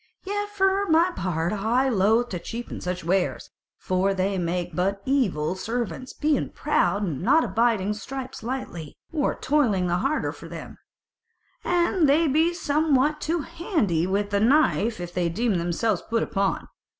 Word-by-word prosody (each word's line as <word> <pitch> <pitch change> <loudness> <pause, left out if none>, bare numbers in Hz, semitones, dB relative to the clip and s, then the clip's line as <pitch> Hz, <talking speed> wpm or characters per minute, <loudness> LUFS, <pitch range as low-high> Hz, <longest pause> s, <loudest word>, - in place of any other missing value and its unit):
Yet 410 +1 -3
for 395 0 +1
my 335 +2 +4
part 175 -1 -1
I 230 +6 +1
were - - 0
loth 220 +5 +3
to 180 - -4
cheapen 235 +6 -6
such 180 0 -3
wares: 180 +2 -1 0.3
for 190 +1 0
they 195 +1 0
make 175 -1 -2
but 195 +3 0
evil 190 - +1
servants, 235 +5 -4
being 300 -2 0
proud, 205 -9 0
and 160 -9 -3
not 305 +7 +4
abiding 215 -1 +1
stripes 260 +5 -7
lightly, 220 - -5 0.2
or 300 -4 0
toiling 250 -10 +1
the 175 0 +1
harder 275 +11 0
for - - -11
them; - - -9 0.8
and 345 -2 +2
they 315 +4 +4
be 315 +5 +3
somewhat 300 -3 +1
too 330 +1 0
handy 290 - -1
with 200 +2 -1
the 200 - +2
knife 235 -3 +3
if 175 0 -6
they 175 -2 0
deem 210 +1 0
themselves 175 +6 0
put 230 0 +1
upon. 195 -1 -1
225 Hz, 160 wpm, -25 LUFS, 185-295 Hz, 0.8 s, my